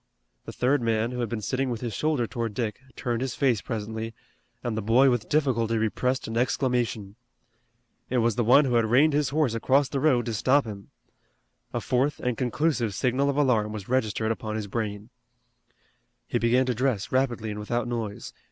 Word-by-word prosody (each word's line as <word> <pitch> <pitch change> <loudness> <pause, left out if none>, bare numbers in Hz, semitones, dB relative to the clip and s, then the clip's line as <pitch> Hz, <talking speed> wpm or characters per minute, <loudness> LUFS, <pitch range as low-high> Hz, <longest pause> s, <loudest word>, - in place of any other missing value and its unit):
The - - -6
third 130 +2 +1
man, 115 0 0
who 125 - -5
had 120 -3 -1
been 110 -3 -4
sitting 130 +3 -1
with 115 -2 -4
his 120 -3 -3
shoulder 150 +1 0
toward 115 -3 -4
Dick, 110 -4 -2 0.2
turned 120 -1 -2
his 130 -2 -2
face 125 -8 +2
presently, 110 0 -5 0.5
and 120 -2 -2
the 110 - -1
boy 125 +6 +4
with 120 -3 -2
difficulty 120 -7 +1
repressed 125 +4 -1
an 115 - -5
exclamation. 120 -5 -1 0.9
It 130 - 0
was 115 -2 +2
the 120 - +1
one 130 +6 +6
who 125 - 0
had 115 -1 +3
reined 135 +7 +4
his 145 -2 +1
horse 145 -5 +1
across 130 +4 +2
the 140 - -2
road 130 -5 +3
to 115 - -3
stop 130 +6 +3
him. 100 -3 -8 0.8
A - - -2
fourth 135 +3 0
and 125 -1 -1
conclusive 125 -3 0
signal 130 +5 +1
of 140 - -1
alarm 115 -7 +2
was 105 -1 -7
registered 110 -3 0
upon 110 -1 -4
his 110 -1 -3
brain. 105 +1 -4 1.1
He - - -1
began 125 +3 +3
to 125 - 0
dress 120 -4 -1
rapidly 120 -4 0
and 105 - -5
without 120 +3 -2
noise. 115 -4 -4
120 Hz, 190 wpm, -26 LUFS, 110-130 Hz, 1.1 s, one